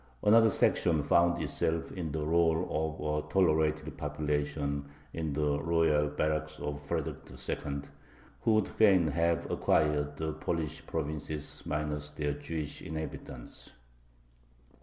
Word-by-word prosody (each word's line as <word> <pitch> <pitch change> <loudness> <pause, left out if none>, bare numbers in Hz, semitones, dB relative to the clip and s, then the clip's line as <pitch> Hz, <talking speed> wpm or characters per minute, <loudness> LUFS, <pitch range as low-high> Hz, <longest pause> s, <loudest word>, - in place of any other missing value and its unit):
Another 115 +1 +7
section 85 -5 +2
found 85 +3 +3
itself 80 +2 -1
in 85 -5 -4
the 75 0 -2
rôle 80 0 +3
of 75 -1 -1
a 75 - -16
"tolerated" 80 -4 +2
population 75 -1 -1 0.3
in 80 -3 -2
the 75 -1 +1
royal 80 -2 +3
barracks 75 +1 -1
of 75 0 -4
Frederick - - -4
II., 70 0 -3 0.6
who 110 - +3
would 110 -2 +2
fain 95 -7 +4
have 85 +2 +1
acquired 75 -1 +2
the 80 -1 -2
Polish 80 -1 -3
provinces 75 -1 -3
minus 75 0 -2
their 75 -1 -2
Jewish 75 +1 -5
inhabitants. 75 -5 -7
75 Hz, 120 wpm, -31 LUFS, 75-80 Hz, 0.6 s, Another